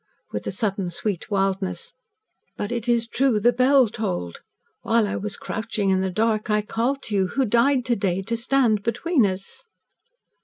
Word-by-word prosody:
with 105 - -4
a - - -1
sudden 195 -2 -2
sweet 185 +2 -3
wildness. 195 -1 -1 0.6
"But 205 - -3
it 240 0 -3
is 235 -1 +2
true 250 -2 +2
the 240 +4 +4
bell 255 +1 +5
tolled! 90 - -4 0.4
While 230 -1 +2
I - - -3
was 205 +1 -4
crouching 215 -3 -2
in 190 0 +2
the 190 - 0
dark 215 +3 0
I 210 0 +2
called 245 +6 -1
to 215 - -6
you 190 -2 +2
who 265 +8 0
died 245 +3 +2
to 240 - +1
day 195 -2 -1
to 230 +4 -2
stand 235 -3 +2
between 240 - +1
us!" 195 - -6
220 Hz, 180 wpm, -23 LUFS, 195-240 Hz, 0.6 s, bell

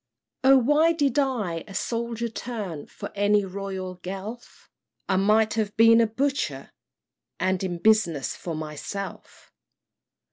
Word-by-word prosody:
"O 270 +1 +7
why 295 +6 +4
did 290 -4 +1
I 210 - -1
a 195 - -10
soldier 235 +1 -2
turn 215 -9 -6
For - - -8
any 205 0 +2
royal 190 -1 -5
Guelph? 195 +6 -8 0.4
I 190 - +1
might 215 +3 +3
have 210 -2 -2
been 230 +1 +7
a 225 - +3
Butcher, 225 - -2 0.7
and 185 0 0
In 180 -2 -2
business 170 -8 +2
for 170 -2 -5
myself! 155 +6 -7
210 Hz, 130 wpm, -25 LUFS, 185-235 Hz, 0.7 s, O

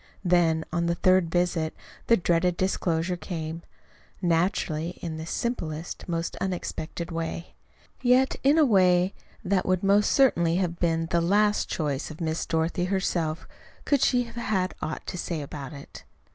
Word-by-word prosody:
Then, 165 -3 +3
on 170 -1 +1
the 170 - +1
third 185 -1 +3
visit, 175 -2 0 0.3
the 230 - +5
dreaded 175 0 +1
disclosure 180 -2 0
came, 165 -2 -5 0.6
naturally, 170 -1 0
and 170 - -3
in 160 - -5
the 160 +1 -6
simplest, 170 -8 -4
most 165 0 -2
unexpected 175 -2 -4
way; 165 +1 -4 0.5
yet 255 +1 +4
in 280 +4 +4
a 315 - +6
way 185 -4 +4 0.3
that 185 0 +2
would 185 0 +1
most 200 +1 +4
certainly 170 -12 +3
have 175 -2 -1
been 165 -1 +1
the 170 - +3
last 205 +4 +2
choice 145 -4 -2
of 155 - -10
Miss 160 -1 -2
Dorothy 165 +2 0
herself 175 -4 -1 0.4
could 285 -2 +2
she 250 -1 +3
have 235 0 -12
had 195 -5 -1
aught 155 - -4
to 180 - -5
say 170 -2 -3
about 140 -2 -7
it. 140 -1 -11
175 Hz, 160 wpm, -26 LUFS, 165-190 Hz, 0.6 s, a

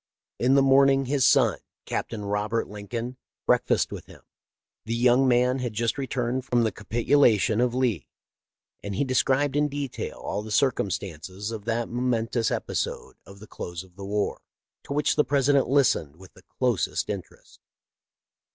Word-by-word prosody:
In 130 +3 +3
the 140 - +5
morning 135 0 +5
his 135 0 +2
son. - - +4 0.3
Captain 105 -3 -4
Robert 105 +3 -1
Lincoln, 115 +5 -6 0.3
break - - +2
fasted - - +1
with - - -8
him. - - -16 0.6
The 115 - -2
young 125 +2 +4
man 125 +1 +3
had 125 -3 -3
just 115 +1 0
returned 130 -1 -2
from 120 -2 +1
the 110 - +1
capitulation 115 -1 +2
of 125 -1 +1
Lee, 120 - 0 0.7
and' 100 -1 -5
he 140 - +1
described 135 +2 +1
in 150 0 +3
detail 140 -2 -5
all 105 - -4
the 110 - -9
circumstances 100 - -1
of 110 -3 -7
that 115 0 -1
momentous 120 -1 0
episode - - -3
of 100 - -13
the 105 - -11
close 85 -4 -7
of 90 -1 -21
the 100 - -9
war, 100 +1 -2 0.4
to - - -4
which 150 0 +1
the 150 - +5
President 140 0 +2
listened 125 - +2
with 95 +2 -16
the - - -18 0.2
closest 125 -8 0
interest. - - -8
120 Hz, 160 wpm, -26 LUFS, 105-130 Hz, 0.7 s, the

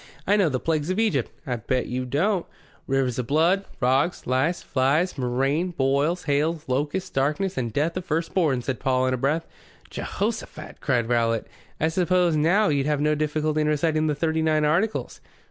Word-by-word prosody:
"I 200 - +3
know 195 -6 +3
the 130 -2 -1
Plagues 155 +1 -1
of 185 - -1
Egypt." 210 - +1 0.2
"I 125 -4 -2
bet 125 +3 -1
you 125 +1 -3
don't." 170 - 0 0.4
"Rivers 130 -2 0
of 120 - -3
Blood, 170 +7 +2
Frogs, 135 +7 +1
Lice, 130 +8 0
Flies, 140 +7 +1
Murrain, 135 +7 0
Boils, 140 +6 +1
Hails, 150 +2 0
Locusts, 145 +8 -2
Darkness 150 +8 0
and 120 -3 -2
Death 150 +8 0
of 185 - -3
Firstborn," 160 -5 0
said 130 -1 -3
Paul, 130 -1 +1
in 130 - +1
a - - 0
breath. 150 +6 0 0.5
"Jehosaphat!" - - -4
cried 120 -2 +1
Rowlatt. 115 -2 +1 0.3
"I 160 - +2
suppose 180 0 +2
now 175 +8 +3
you'd 140 -1 +1
have 150 -1 +1
no 150 +1 +2
difficulty 155 0 0
in 150 - +1
reciting 155 +1 +1
the 150 - 0
Thirty 160 +1 0
nine 155 -1 +2
Articles." 190 +9 0
150 Hz, 180 wpm, -24 LUFS, 130-165 Hz, 0.5 s, I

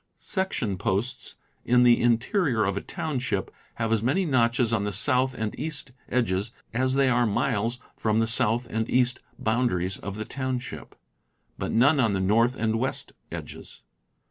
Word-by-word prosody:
Section 145 - -2
posts 100 +9 -2 0.3
in 125 0 +4
the 120 -1 +5
in 120 -1 +4
terior 125 - 0
of 100 - -1
a 100 - -2
township 130 -6 -3 0.2
have 115 -1 -1
as 110 - +1
many 140 +11 +1
notches 120 -4 +2
on 105 -3 +1
the 105 - -2
south 130 +5 +3
and 110 -2 -3
east 150 -4 -2 0.2
edges 105 -4 0 0.2
as 130 +2 +1
they 135 -1 +3
are 120 -1 +3
miles 115 +2 0 0.2
from 110 -1 0
the 115 - +3
south 115 +1 +3
and 110 +1 -2
east 125 0 +2 0.2
boundaries 110 -6 0
of 100 0 -6
the 110 +1 -5
township, 130 -1 -5 0.6
but - - -2
none 140 +6 +4
on 115 -5 +2
the 95 - 0
north 115 +6 +2
and 110 -1 0
west 130 +2 -1 0.2
edges. - - -8
120 Hz, 170 wpm, -26 LUFS, 110-130 Hz, 0.6 s, the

